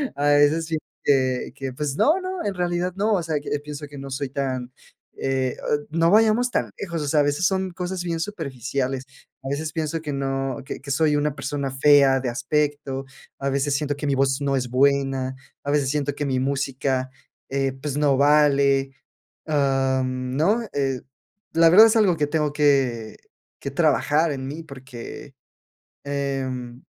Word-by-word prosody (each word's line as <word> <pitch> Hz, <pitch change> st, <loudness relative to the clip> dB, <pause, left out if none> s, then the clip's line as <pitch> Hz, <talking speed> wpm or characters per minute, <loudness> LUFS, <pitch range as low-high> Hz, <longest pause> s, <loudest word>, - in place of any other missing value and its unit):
a 145 Hz, -, -1 dB
veces, 145 Hz, +3 st, +4 dB
pienso 160 Hz, -1 st, -1 dB, 0.2 s
que 130 Hz, -3 st, +1 dB
que, 135 Hz, -1 st, -5 dB
pues, 140 Hz, +1 st, -3 dB
no, 315 Hz, -, +3 dB
no, 370 Hz, -1 st, -4 dB
en 205 Hz, -, -1 dB
realidad 175 Hz, 0 st, -1 dB
no, 215 Hz, +2 st, +2 dB
o 185 Hz, -4 st, +1 dB
sea, 160 Hz, -2 st, -1 dB
que 145 Hz, 0 st, -3 dB
pienso 150 Hz, 0 st, -7 dB
que 145 Hz, 0 st, -11 dB
no 135 Hz, 0 st, -7 dB
soy 135 Hz, +1 st, -3 dB
tan, 130 Hz, -2 st, -3 dB, 0.4 s
eh, 130 Hz, -1 st, -1 dB
ah, -, -, +1 dB
no 165 Hz, +2 st, +2 dB
vayamos 225 Hz, +3 st, +4 dB
tan -, -, 0 dB
lejos, 170 Hz, -5 st, -4 dB
o 145 Hz, -, -3 dB
sea, 150 Hz, +1 st, +3 dB
a -, -, +3 dB
veces 145 Hz, +5 st, 0 dB
son 190 Hz, -1 st, -1 dB
cosas 180 Hz, 0 st, -4 dB
bien 170 Hz, -2 st, -2 dB
superficiales. 135 Hz, -, -3 dB, 0.4 s
A -, -, -6 dB
veces 150 Hz, +2 st, -2 dB
pienso 160 Hz, 0 st, -2 dB
que 150 Hz, -2 st, -4 dB
no 135 Hz, -2 st, -2 dB
que -, -, -6 dB
que 140 Hz, -, -6 dB
soy 150 Hz, +1 st, +2 dB
una 145 Hz, 0 st, 0 dB
persona 140 Hz, -3 st, -3 dB
fea 135 Hz, 0 st, +5 dB
de 130 Hz, -, -3 dB
aspecto, 140 Hz, +2 st, -1 dB, 0.3 s
a 140 Hz, -, -2 dB
veces 140 Hz, +1 st, 0 dB
siento 145 Hz, 0 st, -1 dB
que 145 Hz, -, -5 dB
mi 140 Hz, -, +2 dB
voz 135 Hz, +1 st, +1 dB
no 140 Hz, -1 st, +1 dB
es 125 Hz, -1 st, -2 dB
buena, 135 Hz, 0 st, +1 dB, 0.3 s
a 145 Hz, -, -2 dB
veces 145 Hz, -2 st, +2 dB
siento 145 Hz, 0 st, -1 dB
que 145 Hz, -, -2 dB
mi 130 Hz, -2 st, 0 dB
música, 135 Hz, -1 st, -1 dB, 0.4 s
eh, 135 Hz, 0 st, 0 dB
pues 145 Hz, -1 st, -3 dB
no 145 Hz, -2 st, +3 dB
vale, 140 Hz, -1 st, +4 dB, 0.6 s
am, 130 Hz, -3 st, 0 dB
¿no? 205 Hz, +10 st, +2 dB
Eh, 135 Hz, -2 st, -1 dB, 0.5 s
la 165 Hz, 0 st, +6 dB
verdad 210 Hz, +7 st, +9 dB
es 225 Hz, -, +2 dB
algo 195 Hz, -6 st, +3 dB
que 150 Hz, -1 st, +1 dB
tengo 150 Hz, -1 st, 0 dB
que 135 Hz, -7 st, +1 dB, 0.4 s
que 140 Hz, -, -5 dB
trabajar 155 Hz, +1 st, +2 dB
en 130 Hz, -1 st, -5 dB
mí 150 Hz, +4 st, -6 dB
porque, 130 Hz, -5 st, -10 dB, 0.7 s
em, 135 Hz, -3 st, -3 dB
140 Hz, 180 wpm, -23 LUFS, 135-155 Hz, 0.7 s, verdad